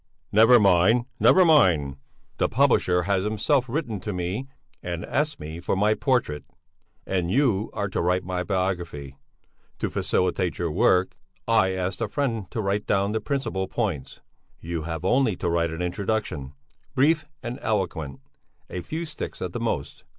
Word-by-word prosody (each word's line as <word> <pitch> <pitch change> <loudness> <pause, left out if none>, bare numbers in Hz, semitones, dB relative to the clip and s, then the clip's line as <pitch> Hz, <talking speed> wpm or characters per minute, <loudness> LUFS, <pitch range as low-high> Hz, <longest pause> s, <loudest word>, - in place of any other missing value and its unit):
"Never 115 +4 +7
mind! 100 +4 +4
Never 185 -1 +6
mind! 85 - +4 0.4
The - - +2
publisher 115 -9 +3
has 95 0 +1
himself 120 +5 +1
written 120 -6 -2
to 105 - -4
me 90 +8 -3 0.3
and 85 -1 -4
asked 150 +1 -1
me 80 +2 -7
for 90 - -1
my 105 +3 +3
portrait. 115 - 0 0.6
And 90 -3 -1
you 115 -3 +2
are 100 -2 -2
to - - -1
write 90 +2 +1
my 90 0 -2
biography! 90 -8 -3 0.6
To - - -2
facilitate 90 -1 0
your 85 -2 -1
work, 90 +2 +2 0.3
I 110 -5 +3
asked 95 0 -3
a - - 0
friend 115 -9 -2
to 110 - -3
write 100 +1 -1
down 100 0 +1
the 110 - -1
principal 130 -9 -2
points. 90 - -3 0.4
You 85 -1 -4
have 80 +1 -4
only 125 -1 +3
to 90 - -3
write 85 0 +1
an 80 +2 -4
introduction, 90 -7 -2 0.4
brief 150 +3 +3 0.2
and 120 0 -5
eloquent 80 -10 -2 0.5
a 90 - -4
few 160 - -4
sticks 155 - -7
at - - -4
the - - -3
most. - - -3
95 Hz, 160 wpm, -25 LUFS, 85-115 Hz, 0.6 s, Never